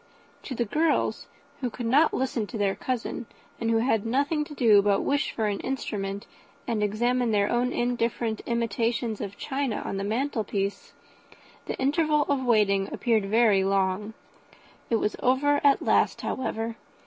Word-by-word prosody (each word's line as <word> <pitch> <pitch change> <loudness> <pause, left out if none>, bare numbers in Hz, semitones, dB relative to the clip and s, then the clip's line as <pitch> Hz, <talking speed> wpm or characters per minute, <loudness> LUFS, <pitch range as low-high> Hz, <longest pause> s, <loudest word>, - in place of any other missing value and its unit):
To 265 - -6
the 235 - 0
girls, 310 +8 0 0.3
who 255 -3 -2
could 240 +1 -6
not 285 +7 +4
listen 250 -5 -1
to 235 - -6
their 200 -2 +1
cousin, 245 -1 -4 0.3
and 230 - -1
who 225 - +3
had 225 -2 +1
nothing 285 +6 0
to 295 - -10
do 220 -6 +5
but 200 0 +3
to - - 0
wish 285 +1 0
for 220 - -2
an 205 -1 -1
instrument, 200 -6 -4 0.4
and 230 -3 -1
examine 240 +4 +1
their 205 -2 +2
own 245 +1 +1
indifferent 235 -2 -1
imitations 230 -1 -1
of 200 -1 -6
china 265 -5 -2
on 195 - -3
the 195 - -2
mantel 230 +3 -1
piece, 200 0 -3 0.7
the - - -3
interval 300 +2 +2
of 280 -2 +1
waiting 205 -5 +2
appeared 220 -4 +1
very 215 -2 +4
long. 195 +2 0 0.7
It 230 - +2
was 210 -1 0
over 285 +3 +2
at 280 -1 +4
last, - - +2
however. 225 -2 -3
230 Hz, 165 wpm, -26 LUFS, 210-260 Hz, 0.7 s, do